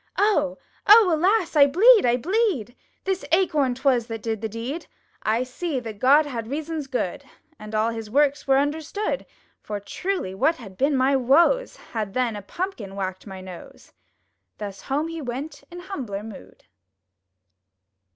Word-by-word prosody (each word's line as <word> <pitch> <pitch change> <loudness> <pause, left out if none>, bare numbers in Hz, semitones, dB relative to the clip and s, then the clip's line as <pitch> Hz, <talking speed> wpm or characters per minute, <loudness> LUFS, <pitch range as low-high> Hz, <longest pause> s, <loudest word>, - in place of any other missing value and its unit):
"Oh! 295 -10 +2 0.3
Oh! 420 -3 +8
alas! 360 +2 +2
I 285 -2 +7
bleed! 415 - +6
I 240 +1 +3
bleed! 345 - 0 0.3
This 385 -1 -1
Acorn 310 -8 +2
'twas 255 -3 +1
that 225 -2 -6
did 220 -2 -2
the 220 - -3
deed! 245 +10 -5 0.3
I 225 +3 +1
see 270 +3 -3
that 225 -4 -8
God 285 +6 +5
had 235 -6 -5
reasons 305 +2 -4
good. 250 -8 -3 0.4
And 215 0 -7
all 220 +2 +2
His 225 -2 -6
works 285 +4 +2
were 270 0 +5
understood, 315 - -2 0.3
For, 210 -1 -5
truly, 355 - -3
what 315 +12 +2
had 200 -9 -12
been 275 +7 +1
my 265 +2 +3
woes. 320 - +3
Had, 215 -4 -5
then, 250 -3 0
a 205 - -6
Pumpkin 215 - -5
whacked 190 0 -4
my 190 -1 -8
nose!" 185 -2 -12 0.6
Thus 200 -2 -7
home 290 +4 -1
he 330 -1 -6
went 280 +4 -6
in 350 0 -9
humbler 255 - -5
mood! 220 -3 -12
270 Hz, 160 wpm, -24 LUFS, 225-330 Hz, 0.6 s, Oh